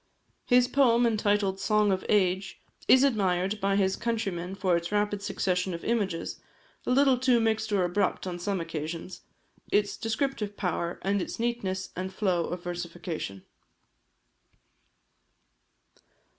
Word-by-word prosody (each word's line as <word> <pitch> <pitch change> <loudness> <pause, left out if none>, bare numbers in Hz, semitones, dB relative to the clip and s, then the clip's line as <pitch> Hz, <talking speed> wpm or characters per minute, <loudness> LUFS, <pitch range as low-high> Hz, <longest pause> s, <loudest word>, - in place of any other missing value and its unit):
His 245 -1 +5
poem 245 -4 +4
entitled 205 -3 +1
the - - -10
"Song 210 -1 +3
of 190 -1 -1
Age," 190 -2 +1 0.3
is 260 +1 +7
admired 200 -5 +1
by 195 0 +2
his 190 -1 +2
countrymen 195 -6 -2
for 185 -2 +1
its 170 +2 -2
rapid 205 -1 0
succession 185 -2 -1
of 170 - -8
images 200 -8 -1 0.5
(a - - 0
little 265 0 +4
too 250 -2 +4
mixed 220 -1 0
or 195 -3 +2
abrupt 185 +2 0
on 175 -1 -4
some 195 +1 -1
occasions), 165 +2 -5 0.5
its 205 -1 +1
descriptive 225 -2 -2
power, 170 -2 -2
and 200 0 +1
its - - -5
neatness 195 -6 -2
and 185 +1 -4
flow 185 -4 0
of 180 0 -5
versification. 170 - -5
195 Hz, 135 wpm, -28 LUFS, 180-220 Hz, 0.5 s, is